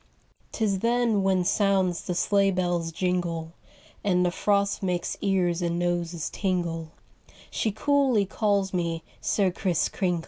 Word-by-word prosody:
'Tis 205 -4 0
then 235 -1 +2
when 190 -1 +2
sounds 190 -2 +1
the 180 - -4
sleigh 200 +2 +3
bell's 175 -3 -1
jingle 170 -2 -2 0.5
And 180 -2 +2
the 175 - +1
frost 200 +2 +1
makes 180 -2 -1
ears 180 -3 +1
and 170 -1 -1
noses 175 -2 -2
tingle, 170 -4 -2 0.6
She 220 - 0
coolly 265 -2 +2
calls 200 -1 0
me 170 -2 -1 0.2
'Sir 195 -3 +1
Kriss 175 -2 0
Kringle. 180 -4 -1
185 Hz, 135 wpm, -26 LUFS, 175-200 Hz, 0.6 s, sleigh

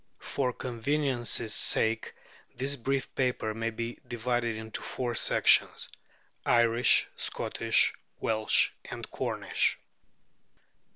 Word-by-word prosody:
For 130 -3 -2
convenience's 120 -2 -1
sake, 110 +1 +3 0.4
this 135 +3 -1
brief 135 +1 -2
paper 125 -4 -1
may 115 +1 -2
be 115 +1 -6
divided 120 -1 -1
into 110 0 -4
four 120 -2 -2
sections: - - +3 0.6
Irish, 120 0 +4
Scottish, - - +1 0.3
Welsh, 110 -1 +2
and - - -7
Cornish. - - 0
120 Hz, 95 wpm, -29 LUFS, 115-125 Hz, 0.6 s, Irish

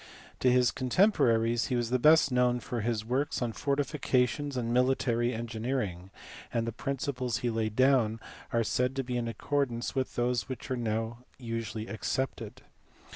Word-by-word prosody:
To 130 - +3
his 125 -1 +4
contemporaries 120 - +2
he 125 - -1
was 120 -1 -1
best 140 +3 +5
known 125 -1 +2
for 120 -1 -4
his 110 -1 -1
works 130 +5 -1
on 120 -2 -2
fortifications 140 -1 0
and 120 -1 -1
military 125 -1 +2
engineering, 110 -5 -3 0.4
and 115 -1 0
the 115 - -2
principles 125 0 -2
he 120 - +1
laid 110 -1 -2
down 130 -4 +3 0.3
are 115 0 +2
said 125 +4 0
to 135 - -1
be 125 0 -4
in 120 -1 -1
accordance 120 +1 -1
with 130 -1 -2
those 120 +1 0
which 130 +1 -6
are - - +1
now 115 0 -2 0.2
usually 115 -2 -4
accepted. 125 +2 -3
120 Hz, 155 wpm, -30 LUFS, 115-130 Hz, 0.4 s, best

